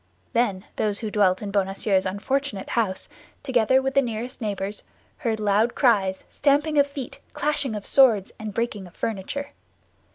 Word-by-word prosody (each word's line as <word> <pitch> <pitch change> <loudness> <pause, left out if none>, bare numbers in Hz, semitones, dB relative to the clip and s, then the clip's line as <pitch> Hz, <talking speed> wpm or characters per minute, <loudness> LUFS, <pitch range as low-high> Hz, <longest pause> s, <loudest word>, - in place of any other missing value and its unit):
Then 210 -5 +1
those 210 -2 0
who 215 -2 -3
dwelt 200 -2 +2
in 200 - -4
Bonacieux's 195 0 +1
unfortunate 210 +3 -2
house, 205 -5 -1 0.4
together 260 -1 +3
with 270 0 -1
the 275 - +5
nearest 240 +1 -5
neighbors, 205 -1 -3 0.4
heard 225 -5 -1
loud 210 +3 +2
cries, 195 -7 +2
stamping 295 +1 +2
of 285 - +5
feet, 280 -3 -7
clashing 290 -5 0
of 205 - -6
swords, 230 -8 +5
and 215 -1 -5
breaking 210 -3 -3
of 175 - -18
furniture. 225 +7 -3
220 Hz, 155 wpm, -24 LUFS, 200-265 Hz, 0.4 s, the